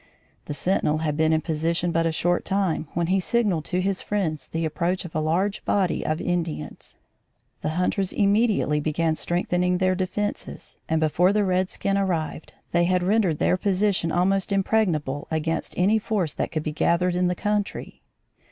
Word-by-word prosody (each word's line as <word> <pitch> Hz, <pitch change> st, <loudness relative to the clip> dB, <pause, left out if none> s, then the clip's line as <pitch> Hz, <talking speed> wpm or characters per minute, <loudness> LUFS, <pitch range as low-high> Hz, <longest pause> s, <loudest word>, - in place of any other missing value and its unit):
The 145 Hz, -, -5 dB
sentinel 155 Hz, -3 st, +1 dB
had 155 Hz, -2 st, -1 dB
been 160 Hz, +1 st, +2 dB
in 160 Hz, 0 st, +2 dB
position 165 Hz, +2 st, -1 dB
but 165 Hz, 0 st, +1 dB
a -, -, +1 dB
short 175 Hz, +2 st, 0 dB
time 190 Hz, -5 st, 0 dB
when 170 Hz, 0 st, +1 dB
he 190 Hz, +3 st, +2 dB
signalled 200 Hz, -6 st, 0 dB
to 180 Hz, -, -1 dB
his 195 Hz, 0 st, -1 dB
friends 160 Hz, -10 st, -2 dB
the 165 Hz, 0 st, -2 dB
approach 175 Hz, +4 st, -1 dB
of 170 Hz, -, -9 dB
a 155 Hz, -, 0 dB
large 180 Hz, +6 st, 0 dB
body 190 Hz, -4 st, +1 dB
of 155 Hz, +1 st, -1 dB
Indians. 175 Hz, -3 st, -3 dB, 0.7 s
The 155 Hz, +2 st, -2 dB
hunters 185 Hz, +1 st, 0 dB
immediately 205 Hz, -7 st, +2 dB
began 155 Hz, +2 st, 0 dB
strengthening 180 Hz, +2 st, 0 dB
their 185 Hz, 0 st, +2 dB
defences, 190 Hz, +3 st, -4 dB
and 160 Hz, 0 st, +2 dB
before 160 Hz, +4 st, +3 dB
the 205 Hz, 0 st, +2 dB
redskin 185 Hz, +1 st, 0 dB
arrived, 165 Hz, -5 st, -2 dB, 0.2 s
they 175 Hz, 0 st, +3 dB
had 180 Hz, 0 st, +1 dB
rendered 190 Hz, -4 st, +2 dB
their 180 Hz, -, +2 dB
position 195 Hz, -3 st, +1 dB
almost 190 Hz, +3 st, +1 dB
impregnable 180 Hz, -9 st, 0 dB
against 160 Hz, +1 st, -2 dB
any 205 Hz, +5 st, +3 dB
force 200 Hz, -8 st, -1 dB
that -, -, -3 dB
could 155 Hz, -2 st, -2 dB
be 155 Hz, -, -2 dB
gathered 175 Hz, +3 st, +1 dB
in 180 Hz, 0 st, +2 dB
the 180 Hz, -, 0 dB
country. 210 Hz, +1 st, -3 dB
180 Hz, 170 wpm, -24 LUFS, 160-195 Hz, 0.7 s, before